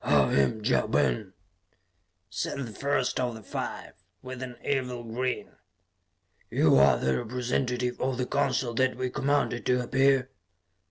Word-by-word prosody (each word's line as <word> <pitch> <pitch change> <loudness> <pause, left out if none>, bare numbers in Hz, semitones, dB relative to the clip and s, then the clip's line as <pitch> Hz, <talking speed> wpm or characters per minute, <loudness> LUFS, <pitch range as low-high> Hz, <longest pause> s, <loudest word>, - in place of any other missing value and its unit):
"I - - +3
am 105 +11 +1
Ja - - +2
Ben," 70 - 0 0.9
said 95 +6 -3
the 130 -5 -5
first 135 +2 -1
of 125 -2 -1
the 110 - -10
five, - - -5 0.3
with 130 0 -7
an 125 -1 -6
evil 125 -3 -1
grin. 125 +3 -3 0.9
"You - - +4
are 70 -3 +6
the 65 +2 0
representative 125 +1 -2
of 130 -1 0
the 125 - -1
Council 120 -1 0
that 130 +2 +1
we 130 -1 -2
commanded 135 -4 0
to 125 0 +2
appear?" 135 +1 +2
125 Hz, 145 wpm, -28 LUFS, 115-130 Hz, 0.9 s, are